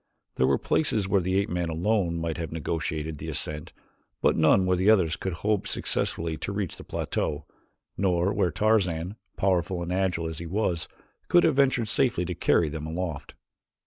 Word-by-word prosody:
There 65 - +3
were - - +3
places 110 -10 +1
where 100 -1 +3
the 95 +2 0
ape 100 - +1
man 90 -1 -1
alone 85 +1 0
might 80 -1 -2
have 80 -2 -4
negotiated 80 -1 -3
the 80 - -6
ascent 75 +1 -3 0.5
but - - +3
none 80 +4 +4
where 90 0 +3
the 95 +3 +2
others 90 -7 +4
could 95 - -4
hope 105 -2 +1
successfully 80 -1 -1
to 100 - -4
reach 100 -4 -3
the - - -10
plateau, 75 +1 -3 0.5
nor 90 0 +1
where 90 - +2
Tarzan, 90 -2 +1 0.2
powerful 90 -2 +1
and 85 +1 -3
agile 90 -3 0
as 80 -1 -6
he 85 - -6
was, 90 -3 -1 0.4
could 175 - +5
have 160 -4 +3
ventured 130 -5 +3
safely 120 -7 +1
to - - -3
carry 85 - +2
them 80 +1 -5
aloft. 80 -3 -4
90 Hz, 180 wpm, -27 LUFS, 80-100 Hz, 0.5 s, could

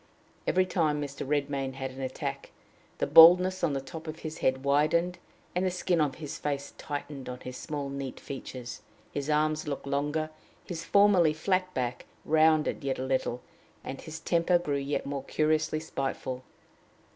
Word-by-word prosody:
Every 185 0 +3
time 155 -5 +1
Mr. 140 -2 -5
Redmain 140 -2 -1
had 130 0 -4
an 130 +1 -8
attack, 130 0 -4 0.5
the - - +1
baldness 180 +3 +8
on 150 - +2
the 135 - 0
top 160 +4 -9
of 155 +1 -6
his 155 0 -5
head 130 0 +1
widened, 155 +5 +2 0.3
and 180 - 0
the 185 - +2
skin 180 -2 +1
of 145 -3 +1
his 150 -4 -6
face 140 -1 -3
tightened 145 -2 -5
on 125 0 -7
his 125 - -7
small, 145 0 -4
neat 140 -1 -5
features; 125 -2 -7 0.3
his 145 +1 -3
long 150 - +4
arms 155 0 -1
looked 140 -2 -4
longer; 145 +3 -1 0.3
his 170 -2 -5
formerly 200 -6 +5
flat 185 +3 0
back 125 -1 -2 0.2
rounded 155 -1 +3
yet 135 -1 -1
a 130 - -3
little; 130 -2 -1 0.4
and 135 - -6
his 160 0 -7
temper 170 +2 +3
grew 150 -5 -1
yet 140 +1 -2
more 140 -1 -3
curiously 155 +1 +1
spiteful. 135 -4 -3
150 Hz, 170 wpm, -29 LUFS, 135-160 Hz, 0.5 s, baldness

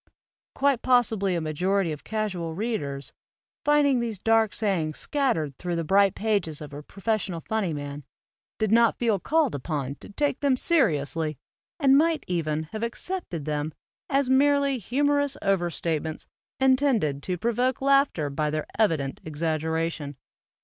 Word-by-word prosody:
Quite 275 -3 +2
possibly 220 -7 +2
a 170 - -1
majority 180 +4 0
of 150 - -7
casual 190 -7 -3
readers, 150 -10 -3 0.5
finding 290 -3 +4
these 230 -3 -3
dark 225 +1 +3
sayings 175 -8 -1
scattered 235 - 0
thru 175 -1 -2
the 165 - -1
bright 195 +3 +3
pages 200 -8 -1
of 150 -2 -9
a 145 - -6
professional 195 0 -2
funny 215 -1 -1
man, 145 -1 -5 0.5
did 215 -2 0
not 230 0 +4
feel 225 -5 +1
called 310 - +1
upon 140 -1 -3
to - - -11
take 285 +6 -1
them 275 -3 +2
seriously 155 - +1 0.4
and 275 -2 +6
might 320 -1 +1
even 155 -3 -1
have 220 - -5
accepted 235 - -4
them 150 0 -2 0.3
as 275 -1 +2
merely 280 0 +3
humorous 285 +5 +1
over 195 -3 +2
statements 160 -2 -3 0.3
intended 260 - +2
to 180 +2 -3
provoke 240 +5 0
laughter 275 - +2
by 150 +2 -1
their 155 0 -2
evident 155 -11 +1
exaggeration. 160 -1 -2
195 Hz, 145 wpm, -26 LUFS, 155-255 Hz, 0.5 s, and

